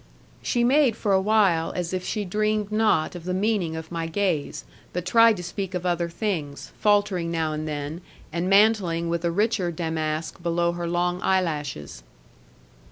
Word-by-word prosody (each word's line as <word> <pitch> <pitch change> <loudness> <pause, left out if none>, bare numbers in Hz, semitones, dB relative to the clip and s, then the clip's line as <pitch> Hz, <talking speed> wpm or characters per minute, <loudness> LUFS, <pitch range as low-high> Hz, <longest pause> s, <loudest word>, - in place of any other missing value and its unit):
She 240 -2 0
made 260 -1 +4
for 210 -3 0
awhile 190 -4 +3
as 175 0 -3
if 185 -1 -2
she 210 +1 -2
dreamed 210 +2 -1
not 215 -7 +2
of 175 -2 -8
the 180 +1 -2
meaning 195 -5 0
of 160 +1 -7
my 165 -1 -3
gaze, 170 -4 -1 0.3
but 180 0 -3
tried 230 +3 +5
to 180 - -6
speak 190 +1 -4
of 180 0 -3
other 175 -1 0
things, 165 -6 -4
faltering 205 -5 +2
now 160 -2 -1
and 155 +1 -4
then, 150 +2 -4 0.3
and 170 +2 -1
mantling 195 -5 +3
with 170 0 -1
a 170 - +1
richer 200 0 +1
damask 160 0 -3
below 170 0 +1
her 175 0 -4
long 175 +1 0
eyelashes. 150 - -1
180 Hz, 165 wpm, -25 LUFS, 165-205 Hz, 0.3 s, tried